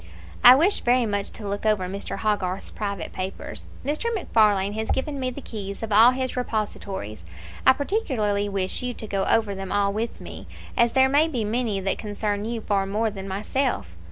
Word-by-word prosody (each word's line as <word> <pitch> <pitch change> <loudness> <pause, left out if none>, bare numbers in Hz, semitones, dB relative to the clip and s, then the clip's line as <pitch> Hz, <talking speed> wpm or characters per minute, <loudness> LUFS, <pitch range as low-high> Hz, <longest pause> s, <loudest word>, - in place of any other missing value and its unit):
"I 250 +1 +11
wish 345 +9 +3
very 245 0 +3
much 205 -2 -2
to 210 - -7
look 200 +1 -3
over 210 -4 +2
Mr. 200 +2 -5
Hogarth's 200 -3 -1
private 200 -5 -4
papers. 185 +1 -6 0.2
Mr. 305 +11 0
MacFarlane 205 - +2
has 220 +1 -3
given 280 +1 -1
me 255 -1 0
the 255 +2 -8
keys 200 -2 -6
of 220 - -4
all 220 +4 +8
his 255 0 -2
repositories. 200 - -4 0.4
I 260 - +9
particularly 250 - -1
wish 190 -1 -1
you 250 -1 -3
to 220 - -7
go 195 -2 -1
over 220 -3 +2
them 195 -1 -6
all 200 -1 +2
with 225 +3 -3
me, - - -9 0.3
as 235 0 +3
there 265 0 +5
may 290 +4 +4
be 255 -8 -2
many 215 -1 0
that 195 0 -1
concern 205 0 -2
you 230 0 -3
far 195 -2 0
more 215 +3 0
than 195 -1 -7
myself. 210 - -2
215 Hz, 190 wpm, -24 LUFS, 200-250 Hz, 0.4 s, I